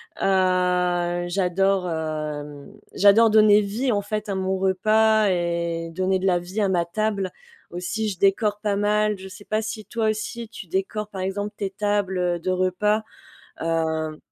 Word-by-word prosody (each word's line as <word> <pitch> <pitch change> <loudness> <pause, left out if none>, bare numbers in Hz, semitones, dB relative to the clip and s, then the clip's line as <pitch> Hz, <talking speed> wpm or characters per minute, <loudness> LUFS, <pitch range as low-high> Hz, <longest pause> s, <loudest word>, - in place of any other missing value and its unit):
Ah, 180 -2 +1
j'adore, 190 0 +1
hem, 150 -2 -5 0.2
j'adore 210 +3 +6
donner 215 -1 +6
vie, 230 +6 -1
en 205 -1 +1
fait, 210 +1 -4
à 195 - -1
mon 190 0 -1
repas 215 +3 +3
et 170 -1 -1
donner 185 +2 0
de 185 - -3
la 175 -1 +3
vie 185 +5 -4
à 200 - +2
ma 175 -2 +1
table. 200 0 -2 0.4
Aussi, 200 +5 -3
je 190 - -6
décore 205 +1 +2
pas 205 -2 0
mal, 210 0 +1
je 190 0 -9
sais 205 +2 -12
pas 215 +1 0
si 215 0 -5
toi 225 -2 -1
aussi, 220 +2 -4
tu 190 - -10
décores, 205 +4 -2
par 190 -3 -6
exemple, 205 +2 -3
tes 195 -1 -3
tables 190 -4 0
de 185 +2 -2
repas? 185 +4 +1 0.6
Hem 160 -1 -1
190 Hz, 165 wpm, -23 LUFS, 175-210 Hz, 0.6 s, j'adore